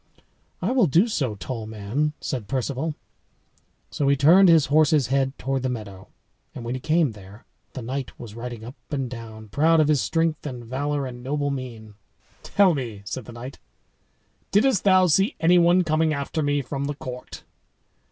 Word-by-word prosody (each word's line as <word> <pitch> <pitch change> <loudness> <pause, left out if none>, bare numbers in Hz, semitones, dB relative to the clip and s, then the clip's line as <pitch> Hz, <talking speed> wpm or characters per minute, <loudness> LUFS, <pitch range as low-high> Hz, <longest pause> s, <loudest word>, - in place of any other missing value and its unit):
"I 195 - +1
will 250 -7 +4
do 170 - +4
so, 135 - -1
tall 110 +4 -6
man," 110 +8 -2
said 125 -7 -4
Perceval. 135 +5 -2 1.0
So 140 - -1
he 140 - +4
turned 175 +7 +6
his 165 -3 +6
horse's 150 -2 +3
head 135 0 +1
toward 135 0 -2
the 130 - -1
meadow. 105 -6 -7 0.5
And 120 - -7
when 120 - -3
he 130 - -5
came 155 -1 +2
there, 100 +1 -14 0.3
the 130 - -6
knight 130 +3 -5
was 115 -4 -9
riding 115 -1 -7
up 120 - -8 0.2
and 135 -4 -2
down, 110 -3 -9
proud 160 +8 +3
of 155 -1 +3
his 150 -3 +3
strength 165 -2 0
and 125 -4 -7
valor 140 +3 -2
and 125 -1 -7
noble 145 +2 -1
mien. 120 -5 -7 0.5
"Tell 195 -3 +3
me," 115 -8 -5
said 115 +3 -5
the - - -10
knight, 120 +3 -9 0.9
"didst 210 -1 +2
thou 185 -1 +6
see 195 +4 +2
any 175 +2 +5
one 175 +2 +4
coming 155 -1 +1
after 140 +3 -3
me 145 -1 0
from 140 +2 -4
the 145 0 -3
court?" 125 -2 -8
135 Hz, 180 wpm, -24 LUFS, 120-155 Hz, 1.0 s, turned